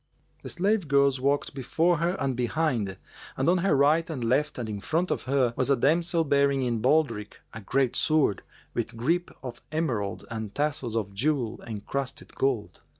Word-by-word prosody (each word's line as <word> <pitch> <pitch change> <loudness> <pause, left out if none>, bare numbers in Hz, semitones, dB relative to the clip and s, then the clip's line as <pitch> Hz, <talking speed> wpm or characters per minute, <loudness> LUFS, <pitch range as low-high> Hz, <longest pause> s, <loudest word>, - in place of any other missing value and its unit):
The - - -7
slave 195 0 +1
girls 140 -1 +3
walked 140 +2 0
before 160 +6 +1
her 170 +4 0
and 135 -2 0
behind 120 - -1 0.4
and 135 - 0
on 180 +1 +4
her 195 -1 +2
right 155 +5 +3
and 140 -7 -4
left 135 +6 +1
and 120 -3 -3
in 105 -2 -5
front 165 - 0
of - - -2
her 130 -2 +2
was 130 - 0
a 140 - +5
damsel 165 +6 +2
bearing 140 -2 +2
in 120 -3 -1
baldric 140 -8 +1
a 115 - -7
great 130 +4 +1
sword, 155 -11 +2 0.3
with - - -3
grip 170 +9 0
of 120 -2 -7
emerald 115 -11 -2
and 110 -3 -5
tassels 145 -6 -1
of 100 -3 -2
jewel 125 +1 -1
encrusted 130 +5 -4
gold. 130 -6 -1
135 Hz, 175 wpm, -27 LUFS, 115-155 Hz, 0.4 s, a